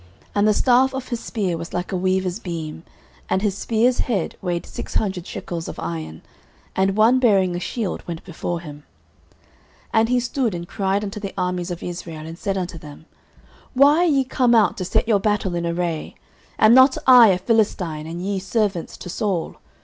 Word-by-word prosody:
09:017:007 -, -, -31 dB
And 205 Hz, +1 st, +2 dB
the 215 Hz, -, +4 dB
staff 260 Hz, +3 st, +3 dB
of 265 Hz, -1 st, -5 dB
his 240 Hz, -2 st, -2 dB
spear 195 Hz, -9 st, -2 dB
was 165 Hz, +1 st, -8 dB
like 180 Hz, 0 st, -3 dB
a -, -, -1 dB
weaver's 185 Hz, +1 st, 0 dB
beam; 165 Hz, -5 st, -6 dB, 0.5 s
and 190 Hz, -, 0 dB
his 200 Hz, -3 st, 0 dB
spear's 230 Hz, +4 st, +1 dB
head 200 Hz, -9 st, -1 dB
weighed 175 Hz, -2 st, -2 dB
six -, -, -8 dB
hundred 190 Hz, -4 st, -1 dB
shekels 170 Hz, -2 st, -5 dB
of -, -, -7 dB
iron: 80 Hz, -2 st, -6 dB, 0.5 s
and 190 Hz, +1 st, +1 dB
one 230 Hz, +4 st, +5 dB
bearing 195 Hz, -7 st, +3 dB
a -, -, -2 dB
shield 210 Hz, 0 st, -3 dB
went 170 Hz, -2 st, -6 dB
before 175 Hz, -1 st, -4 dB
him. 150 Hz, -4 st, -9 dB
09:017:008 -, -, -24 dB, 1.1 s
And 225 Hz, +1 st, +3 dB
he 250 Hz, 0 st, +3 dB
stood 245 Hz, -4 st, -1 dB
and 170 Hz, 0 st, -6 dB
cried 195 Hz, +1 st, -1 dB
unto 205 Hz, 0 st, -5 dB
the 200 Hz, -1 st, -6 dB
armies 180 Hz, 0 st, -2 dB
of 175 Hz, -1 st, -6 dB
Israel, 165 Hz, -3 st, -6 dB
and 165 Hz, +1 st, -9 dB
said 195 Hz, -1 st, -2 dB
unto 180 Hz, -3 st, -4 dB
them, 150 Hz, 0 st, -12 dB, 0.7 s
Why 285 Hz, +3 st, +6 dB
are 355 Hz, -, +4 dB
ye 280 Hz, -5 st, +3 dB
come 250 Hz, -2 st, +2 dB
out 220 Hz, -2 st, +4 dB
to 185 Hz, -, -3 dB
set 200 Hz, -, 0 dB
your 215 Hz, -3 st, +3 dB
battle 205 Hz, -3 st, 0 dB
in 170 Hz, 0 st, -2 dB
array? 170 Hz, -2 st, -3 dB, 0.4 s
am 215 Hz, +1 st, +6 dB
not 260 Hz, +1 st, +6 dB
I 250 Hz, -3 st, +9 dB
a 190 Hz, -3 st, +3 dB
Philistine, 180 Hz, -7 st, 0 dB
and 170 Hz, +2 st, -6 dB
ye 200 Hz, -1 st, -1 dB
servants 195 Hz, -3 st, -2 dB
to -, -, -9 dB
Saul? 180 Hz, -2 st, -2 dB
190 Hz, 200 wpm, -22 LUFS, 175-225 Hz, 1.1 s, I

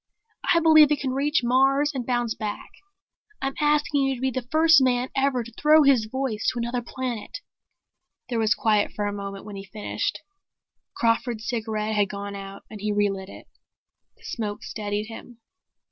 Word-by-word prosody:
"I 335 Hz, -, +5 dB
believe 310 Hz, -2 st, +7 dB
it 295 Hz, -, +2 dB
can 265 Hz, -1 st, -2 dB
reach 290 Hz, +1 st, +1 dB
Mars 270 Hz, +4 st, +3 dB
and 260 Hz, -3 st, -3 dB
bounce 240 Hz, -2 st, 0 dB
back. 210 Hz, -1 st, -6 dB, 0.7 s
I'm 270 Hz, 0 st, -2 dB
asking 295 Hz, -1 st, +2 dB
you 270 Hz, 0 st, +1 dB
to 245 Hz, -, -10 dB
be 265 Hz, 0 st, +1 dB
the 250 Hz, 0 st, -4 dB
first 320 Hz, -1 st, +6 dB
man 250 Hz, -1 st, +1 dB
ever 270 Hz, -2 st, +1 dB
to 235 Hz, -, -11 dB
throw 305 Hz, +1 st, +6 dB
his 265 Hz, -6 st, +4 dB
voice 255 Hz, -3 st, -1 dB
to -, -, -5 dB
another 240 Hz, +1 st, -2 dB
planet." 240 Hz, -2 st, -5 dB, 0.9 s
There 235 Hz, -2 st, -2 dB
was 220 Hz, -1 st, +3 dB
quiet 215 Hz, -2 st, +1 dB
for 205 Hz, -, -2 dB
a 205 Hz, -, -2 dB
moment 200 Hz, -1 st, -6 dB
when 205 Hz, -2 st, -8 dB
he 195 Hz, -, -7 dB
finished. 210 Hz, +2 st, -3 dB, 0.7 s
Crawford's 230 Hz, -1 st, 0 dB
cigarette 220 Hz, -2 st, -2 dB
had 205 Hz, -2 st, +2 dB
gone 200 Hz, 0 st, -6 dB
out 195 Hz, 0 st, -9 dB
and 210 Hz, -2 st, -10 dB
he 210 Hz, 0 st, -1 dB
relit 200 Hz, -2 st, -1 dB
it. -, -, -12 dB, 0.7 s
The -, -, -24 dB
smoke 210 Hz, -3 st, -4 dB
steadied 210 Hz, -1 st, -3 dB
him. 230 Hz, +2 st, -11 dB
240 Hz, 175 wpm, -25 LUFS, 210-270 Hz, 0.9 s, believe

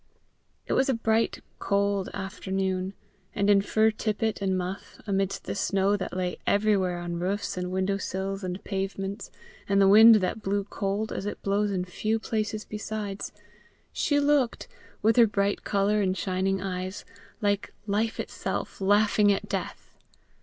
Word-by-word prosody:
It -, -, -2 dB
was 265 Hz, -, +2 dB
a 265 Hz, -, +3 dB
bright 225 Hz, 0 st, 0 dB, 0.2 s
cold 200 Hz, -1 st, 0 dB
afternoon; 190 Hz, -1 st, -3 dB, 0.4 s
and 200 Hz, 0 st, +3 dB
in 200 Hz, -1 st, +5 dB
fur 220 Hz, +2 st, +3 dB
tippet 215 Hz, 0 st, -2 dB
and 190 Hz, -1 st, +1 dB
muff, 185 Hz, +2 st, -5 dB
amidst 195 Hz, -1 st, -1 dB
the -, -, -4 dB
snow 195 Hz, 0 st, +1 dB
that 185 Hz, -2 st, -4 dB
lay 180 Hz, -1 st, -2 dB
everywhere 200 Hz, -4 st, +2 dB
on 175 Hz, 0 st, -4 dB
roofs 195 Hz, +3 st, -2 dB
and 180 Hz, 0 st, -3 dB
window 190 Hz, +1 st, 0 dB
sills 195 Hz, +1 st, -3 dB
and 185 Hz, +1 st, -4 dB
pavements, 195 Hz, +1 st, -4 dB, 0.4 s
and 200 Hz, 0 st, +3 dB
the 195 Hz, -, +6 dB
wind 220 Hz, +3 st, +9 dB
that 210 Hz, +2 st, 0 dB
blew 200 Hz, 0 st, 0 dB
cold 205 Hz, +1 st, -2 dB
as 195 Hz, -, -4 dB
it -, -, -6 dB
blows 205 Hz, +1 st, +1 dB
in 185 Hz, -2 st, -1 dB
few 215 Hz, +4 st, -1 dB
places 215 Hz, -1 st, -2 dB
besides, 210 Hz, -1 st, -5 dB, 0.6 s
she 290 Hz, -1 st, +2 dB
looked, 285 Hz, -4 st, +1 dB, 0.4 s
with 225 Hz, +2 st, +4 dB
her 235 Hz, -2 st, +8 dB
bright 200 Hz, -1 st, 0 dB
colour 205 Hz, +1 st, +1 dB
and 190 Hz, -1 st, 0 dB
shining 190 Hz, +1 st, 0 dB
eyes, 185 Hz, +1 st, -4 dB, 0.3 s
like 205 Hz, 0 st, 0 dB
life 215 Hz, +2 st, -1 dB
itself -, -, -4 dB
laughing 205 Hz, +1 st, +4 dB
at 195 Hz, -, -1 dB
death. -, -, -5 dB
200 Hz, 155 wpm, -27 LUFS, 190-215 Hz, 0.6 s, wind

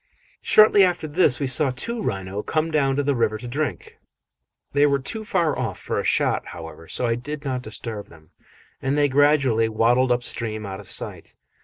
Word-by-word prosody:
Shortly 215 Hz, -2 st, +6 dB
after 180 Hz, -3 st, +1 dB
this 150 Hz, -3 st, +2 dB
we 140 Hz, -, -1 dB
saw 135 Hz, +2 st, +2 dB
two 220 Hz, -, -4 dB
rhino 95 Hz, -, -3 dB
come 155 Hz, +7 st, -1 dB
down 135 Hz, -3 st, +2 dB
to 145 Hz, -, 0 dB
the 140 Hz, 0 st, +1 dB
river 110 Hz, -3 st, 0 dB
to 120 Hz, +3 st, -8 dB
drink; 145 Hz, +2 st, -4 dB, 0.7 s
they 145 Hz, +1 st, +4 dB
were 140 Hz, -1 st, +2 dB
too 215 Hz, +11 st, -5 dB
far 175 Hz, -6 st, 0 dB
off 115 Hz, -7 st, -3 dB
for -, -, -3 dB
a -, -, -2 dB
shot, -, -, +1 dB
however, 80 Hz, 0 st, -10 dB
so 125 Hz, -, -1 dB
I 115 Hz, -, +1 dB
did 145 Hz, +5 st, -6 dB
not 130 Hz, -2 st, -2 dB
disturb 110 Hz, -2 st, -7 dB
them, 80 Hz, -2 st, -19 dB, 0.5 s
and 135 Hz, +2 st, 0 dB
they 145 Hz, -1 st, +4 dB
gradually 135 Hz, -5 st, +3 dB
waddled 120 Hz, +4 st, +2 dB
up 120 Hz, 0 st, +1 dB
stream 110 Hz, -3 st, -4 dB
out 95 Hz, 0 st, -6 dB
of 100 Hz, -, -10 dB
sight. -, -, -5 dB
130 Hz, 195 wpm, -23 LUFS, 110-150 Hz, 0.7 s, Shortly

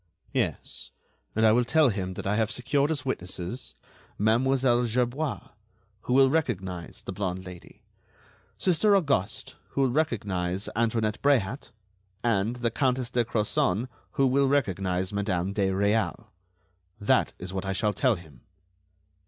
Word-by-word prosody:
"Yes; -, -, -1 dB, 0.5 s
and 110 Hz, +1 st, +3 dB
I 110 Hz, -, +7 dB
will 120 Hz, +3 st, +4 dB
tell 150 Hz, +3 st, +4 dB
him 95 Hz, -3 st, -3 dB
that -, -, -6 dB
I 100 Hz, +2 st, +1 dB
have 110 Hz, -1 st, +1 dB
secured 140 Hz, +4 st, +1 dB
as 145 Hz, -4 st, -1 dB
witnesses: 90 Hz, -, -2 dB, 0.4 s
Mademoiselle 120 Hz, +3 st, +3 dB
Gerbois, 125 Hz, +6 st, -1 dB, 0.5 s
who 125 Hz, -, -2 dB
will 135 Hz, 0 st, +6 dB
recognize 95 Hz, -, -2 dB
the -, -, -5 dB
blonde 95 Hz, -1 st, -3 dB
Lady; 90 Hz, -1 st, -12 dB, 0.7 s
Sister 190 Hz, +4 st, +3 dB
Auguste, 140 Hz, -, 0 dB
who 140 Hz, -, -1 dB
will 130 Hz, -2 st, +3 dB
recognize 100 Hz, -, -1 dB
Antoinette 110 Hz, -1 st, 0 dB
Bréhat; 135 Hz, -4 st, +1 dB, 0.5 s
and 115 Hz, 0 st, +1 dB
the 120 Hz, -1 st, -1 dB
Countess 125 Hz, -1 st, 0 dB
de 120 Hz, -1 st, +2 dB
Crozon, 110 Hz, 0 st, 0 dB, 0.3 s
who 135 Hz, -, +3 dB
will 135 Hz, +1 st, +3 dB
recognize 95 Hz, -8 st, 0 dB
Madame 100 Hz, -2 st, -1 dB
de 100 Hz, -1 st, +1 dB
Réal. 100 Hz, +3 st, 0 dB, 0.7 s
That 100 Hz, -, +2 dB
is 90 Hz, +1 st, -7 dB
what 95 Hz, 0 st, -3 dB
I 95 Hz, -, 0 dB
shall 105 Hz, +1 st, 0 dB
tell 130 Hz, -1 st, +2 dB
him." 80 Hz, -9 st, -14 dB
110 Hz, 140 wpm, -27 LUFS, 95-130 Hz, 0.7 s, I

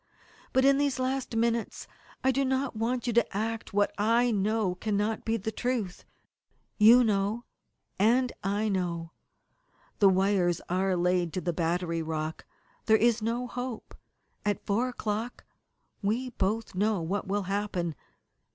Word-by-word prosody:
But 260 Hz, 0 st, +3 dB
in 275 Hz, 0 st, +5 dB
these 285 Hz, -3 st, +1 dB
last 260 Hz, -1 st, -2 dB
minutes 230 Hz, 0 st, 0 dB, 0.4 s
I 265 Hz, -, +4 dB
do 275 Hz, +2 st, +1 dB
not 265 Hz, -1 st, -1 dB
want 235 Hz, +2 st, -1 dB
you 240 Hz, -, 0 dB
to 235 Hz, -3 st, +1 dB
act 225 Hz, +1 st, -3 dB
what 205 Hz, +1 st, +1 dB
I 230 Hz, +3 st, +3 dB
know 210 Hz, -1 st, +1 dB
cannot 210 Hz, +3 st, -1 dB
be 225 Hz, 0 st, +1 dB
the 220 Hz, +1 st, -4 dB
truth. 225 Hz, -5 st, -3 dB, 0.7 s
You 235 Hz, +4 st, +8 dB
know 210 Hz, +2 st, 0 dB, 0.5 s
and 245 Hz, +5 st, +3 dB
I 205 Hz, +3 st, 0 dB
know. 175 Hz, -4 st, -2 dB, 0.9 s
The 200 Hz, -, +7 dB
wires 190 Hz, -2 st, +2 dB
are 185 Hz, +1 st, +1 dB
laid 180 Hz, -1 st, +1 dB
to 185 Hz, -, -2 dB
the 175 Hz, -1 st, -1 dB
battery 170 Hz, 0 st, -1 dB
rock. 160 Hz, 0 st, -4 dB, 0.4 s
There 220 Hz, 0 st, +6 dB
is 230 Hz, 0 st, +2 dB
no 235 Hz, +3 st, -1 dB
hope. 245 Hz, -1 st, -6 dB, 0.5 s
At 205 Hz, -1 st, -1 dB
four 230 Hz, +5 st, +1 dB
o'clock 225 Hz, 0 st, -4 dB, 0.6 s
we 235 Hz, +5 st, -1 dB
both 220 Hz, +1 st, -1 dB
know 205 Hz, +2 st, +1 dB
what 190 Hz, +4 st, -2 dB
will 200 Hz, +1 st, 0 dB
happen. 190 Hz, -3 st, -2 dB
215 Hz, 145 wpm, -28 LUFS, 190-235 Hz, 0.9 s, You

